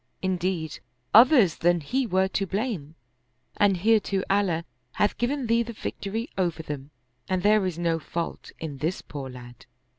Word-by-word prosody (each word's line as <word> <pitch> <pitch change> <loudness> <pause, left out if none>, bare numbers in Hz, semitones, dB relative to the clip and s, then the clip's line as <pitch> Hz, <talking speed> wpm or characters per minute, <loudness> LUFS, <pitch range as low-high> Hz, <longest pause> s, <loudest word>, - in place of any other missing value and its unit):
In 185 -1 +1
deed, 170 -3 -2 0.3
others 235 - +7
than 175 +1 +3
he 250 - -1
were 190 -1 +2
to 195 0 -1
blame, 195 - -3 0.6
and 200 -2 +4
hereto 205 -1 +2
Allah 185 -5 +1 0.3
hath 205 - +1
given 265 +2 0
thee 230 +1 +3
the 235 0 -4
victory 220 +2 -4
over 170 -3 0
them, 145 -2 -6 0.4
and 185 -1 0
there 210 -2 +4
is 175 -3 -4
no 165 -1 0
fault 165 +2 -5
in 150 -4 -6
this 165 +6 -2
poor 140 -3 -7
lad." 120 -1 -12
185 Hz, 160 wpm, -26 LUFS, 165-215 Hz, 0.6 s, others